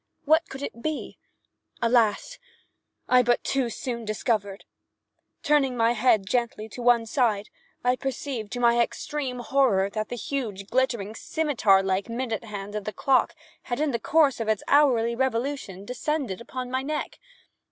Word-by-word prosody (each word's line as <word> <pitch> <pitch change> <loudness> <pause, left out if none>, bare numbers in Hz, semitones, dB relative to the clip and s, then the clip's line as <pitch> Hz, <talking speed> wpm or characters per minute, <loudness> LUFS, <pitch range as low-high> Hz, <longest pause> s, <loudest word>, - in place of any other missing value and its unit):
What 315 +3 +3
could 270 +1 -7
it 235 - -6
be? 310 +1 -4 0.6
Alas! 235 - +2 0.7
I 250 0 +6
but 240 0 +1
too 265 -3 0
soon 235 0 -4
discovered. 210 -2 -2 0.8
Turning 275 -4 +2
my 230 0 +3
head 230 -3 +3
gently 230 0 -1
to 245 - -8
one 240 -1 +4
side, 220 -4 0 0.3
I 250 +1 +2
perceived, 260 -5 -4
to 245 - -3
my 240 0 +4
extreme 260 +1 -3
horror, 230 -7 +2
that 215 0 -3
the 245 - -4
huge, 220 -6 -4
glittering, 235 -5 0
scimetar 240 - +2
like 190 +3 -1
minute 230 -1 -3
hand 205 -1 -7
of 210 -1 -4
the 215 - -4
clock 270 -1 +2 0.3
had, 245 +1 -4
in 300 -1 +1
the 235 - -1
course 295 0 +3
of 225 - -3
its 215 -2 0
hourly 245 -5 +4
revolution, 240 -5 -2
descended 255 -3 -3
upon 250 +1 -6
my 260 0 0
neck. 300 +3 -4
240 Hz, 155 wpm, -26 LUFS, 215-270 Hz, 0.8 s, I